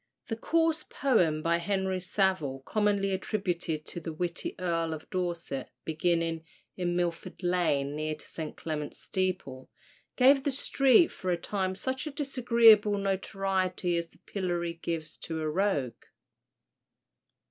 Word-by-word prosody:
The 225 - -1
coarse 325 +5 +1
poem 175 - +1
by 170 0 +3
Henry 190 +1 -1
Savill, 175 -8 0
commonly 205 -2 +1
attributed 180 -5 -2
to - - -5
the 165 0 -5
witty 170 +2 -3
Earl 165 -3 -1
of 155 - -11
Dorset, 170 -7 -3 0.2
beginning 165 0 0 0.3
"In 175 -1 -1
Milford 175 +1 -3
Lane, 160 -6 +1
near 155 0 -2
to 150 - -13
St. 155 -2 -6
Clement's 150 -2 -4
steeple." 185 -9 -3 0.5
gave 270 +2 +6
the 285 - +1
street 275 +2 +4
for 185 - -5
a 175 - +2
time 190 +1 -2
such 260 +8 -2
a - - -4
disagreeable 235 -7 +5
notoriety 195 -2 -1
as 170 0 -1
the - - -23
pillory 175 -3 -2
gives 165 -2 -4
to 160 -1 -5
a 155 - -1
rogue. 155 - 0
180 Hz, 135 wpm, -29 LUFS, 165-205 Hz, 0.5 s, gave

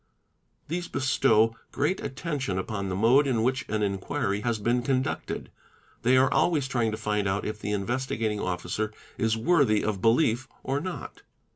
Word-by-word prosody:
These 175 +2 -3
bestow 130 -4 +3 0.2
great 150 +7 0
attention 135 - -3
upon 100 0 -3
the 90 - -2
mode 125 +8 +4
in 115 -4 +1
which 130 +1 0
m 110 -1 0
inquiry 100 0 -1
has 120 -1 0
been 120 +4 +1
conducted, 130 0 -2 0.5
they 130 +2 +4
are 130 0 +4
always 150 -6 +2
trying 120 -4 +1
to 110 - -3
find 105 -2 -1
out 95 +1 -1
if 110 0 -4
he - - -3
Investigating 110 0 -1
Officer 95 +3 -2 0.3
is 110 0 +1
worthy 130 -6 +3
of 105 -3 -2
belief 120 +2 +3 0.2
or 135 +2 0
not. 180 +4 -6
115 Hz, 160 wpm, -27 LUFS, 105-135 Hz, 0.5 s, mode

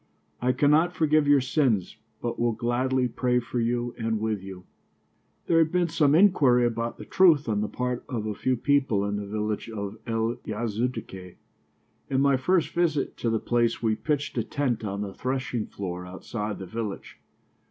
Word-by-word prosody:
I 125 +1 +3
cannot 150 +7 +3
forgive 155 -2 +3
your 145 -1 +5
sins, 125 - +1 0.3
but 120 -1 -3
will 120 -1 +2
gladly 125 +3 0
pray 125 +1 0
for 120 0 -2
you 120 +1 -1
and 110 -1 -1
with 110 -2 -1
you." 95 -1 -9 0.8
There 165 - +3
had 160 -1 +3
been 180 -1 +1
some 150 -2 +3
inquiry 140 -10 +5
about 115 0 -2
the - - -9
truth 165 -7 +4
on 105 -2 0
the 105 - -1
part 125 +1 -3
of 115 -5 -3
a 105 - -2
few 130 +4 0
people 130 -6 +2
in 100 0 -2
the 100 -1 -5
village 105 +2 -3
of 105 -1 -5
El 115 +1 -1
Yazidiyeh. 110 -4 -4 0.7
In 135 - +1
my 140 0 +4
first 170 +7 +1
visit 160 -5 0
to 115 - -1
the 115 -1 +1
place 120 0 0
we 110 -1 +2
pitched 145 +6 -2
a - - 0
tent 120 -2 -2
on 100 -1 -3
the 100 -2 -5
threshing 125 -3 -2
floor 90 -2 -6
outside 105 +3 -5
the 95 - -7
village. 110 +1 -6
120 Hz, 180 wpm, -26 LUFS, 110-135 Hz, 0.8 s, your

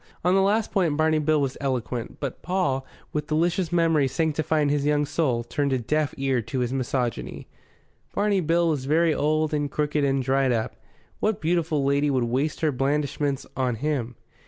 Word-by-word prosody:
On 180 - +4
the 195 - +4
last 210 +3 +1
point 170 -7 +1
Barney 155 0 +3
Bill 155 0 +2
was 135 -2 -2
eloquent; 125 -3 -3
but 140 -4 -5
Paul, 140 -8 -1 0.3
with 150 0 -2
delicious 170 +2 0
memories 165 -6 +2
sanctifying 155 -1 +1
his 145 -1 +1
young 150 0 +2
soul, 130 -6 0
turned 140 +3 -1
a - - +2
deaf 150 +5 -1
ear 135 -3 +1
to 115 +4 -3
his 125 +1 -1
misogyny. 120 - -2 0.7
Barney 205 -1 +2
Bill 170 +1 +2
was 145 -5 -1
very 160 +3 +3
old 155 +1 +1
and 145 -1 0
crooked 150 0 0
and 135 -1 +1
dried 135 0 +2
up; 110 -2 -1 0.4
what 215 -1 0
beautiful 160 -4 0
lady 140 +1 +2
would 130 -3 +1
waste 130 +6 -1
her 155 -2 +2
blandishments 140 +1 -1
on 125 -3 0
him? 125 -2 -2
145 Hz, 180 wpm, -25 LUFS, 135-160 Hz, 0.7 s, On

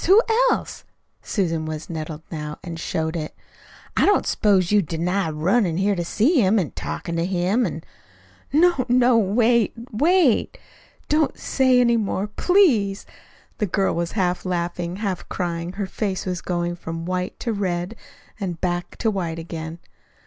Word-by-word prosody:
Who 390 +4 +8 0.3
else?" - - -2 0.4
Susan 165 -6 -1
was 155 0 -5
nettled 155 -1 -6
now, 150 -2 -5
and 165 -2 -6
showed 160 0 -2
it. 155 -2 -4 0.6
"I - - +3
don't 410 - +3
s'pose 195 -4 +2
you'll 210 -1 +5
deny 175 +2 -1
runnin' 170 +3 +1
here 200 +2 +2
to 175 - -2
see 250 - +2
him, 200 +2 +3
an' 180 -7 0
talkin' 170 -1 -4
to 165 - +1
him, 190 +6 +1
an' - - -6 0.4
" - - -30
"No, 330 -2 +4
no, 245 0 +4
wait! 225 +2 +2 0.2
wait! 305 - +3 0.5
Don't 305 0 +1
say 260 -2 +3
any 235 -1 +4
more, 205 -2 -1
PLEASE!" 215 - +2 0.5
The 210 - +1
girl 190 +2 +1
was 170 0 -2
half 180 -4 0
laughing, 175 -1 -2
half 195 -3 -4
crying, 170 -2 -3
and 180 - -7
her 200 0 -2
face 190 -1 -3
was 180 -2 -3
going 175 -1 -2
from 165 0 -6
white 180 0 -3
to 230 - -1
red 185 0 -2 0.4
and 180 -5 -4
back 175 -1 -2
to 225 - +1
white 170 -5 -3
again. 165 0 -6
185 Hz, 165 wpm, -23 LUFS, 170-225 Hz, 0.6 s, Who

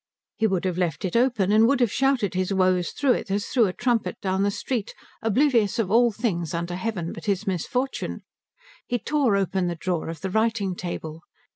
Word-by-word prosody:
He 220 - +2
would 190 -2 -1
have 180 -1 -1
left 180 +2 -1
it 185 - -3
open 230 -5 +2
and 220 +2 +6
would 275 +2 +2
have 240 -4 +2
shouted 265 -8 +1
his 185 +1 -1
woes 185 -2 +2
through 280 -3 +1
it 240 - -1
as 200 +1 0
through 235 -5 +3
a 180 - -3
trumpet 240 -1 0
down 190 0 -1
the 200 - +2
street, 225 +1 -3 0.3
oblivious 225 -2 +2
of 210 -5 0
all 235 +1 +5
things 180 - -2
under 170 +1 -3
heaven 185 -3 -3
but - - -9
his 200 0 0
misfortune. 245 +8 -2 0.6
He 245 - 0
tore 265 -2 +1
open 190 -2 0
the 175 - -2
drawer 170 -1 -2
of 165 - -7
the 190 0 -3
writing 220 -2 +1
table. 165 -3 -6
200 Hz, 200 wpm, -25 LUFS, 185-235 Hz, 0.6 s, and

